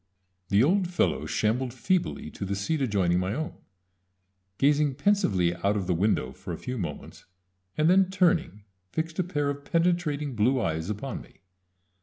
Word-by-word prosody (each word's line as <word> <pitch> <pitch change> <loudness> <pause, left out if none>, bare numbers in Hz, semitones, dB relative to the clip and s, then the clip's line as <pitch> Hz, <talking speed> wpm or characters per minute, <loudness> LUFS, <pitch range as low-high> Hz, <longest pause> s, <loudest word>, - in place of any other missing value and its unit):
] 90 0 -48
The 100 +3 +4
old 185 +5 +3
fellow 175 - 0
shambled 120 +3 0
feebly 180 +7 -1
to - - -7
the 100 +1 -2
seat 140 +11 -1
adjoining 95 -8 +2
my 95 +4 -1
own, 155 +2 -3 1.0
gazing 145 0 +3
pensively 110 - +2
out 100 +4 0
of 95 - -2
the 90 - +1
window 85 -7 +1
for - - -8
a - - -4
few 125 -1 -5
moments, 80 -6 -6 0.5
and 155 +1 +3
then 185 +1 +5
turning 170 - +1 0.3
fixed 160 +1 -3
a - - +3
pair 145 -5 -1
of 140 0 -7
penetrating 165 -4 0
blue 125 +5 +2
eyes 80 -3 -2
upon 105 +4 -4
me. - - -19
130 Hz, 170 wpm, -27 LUFS, 100-160 Hz, 1.0 s, then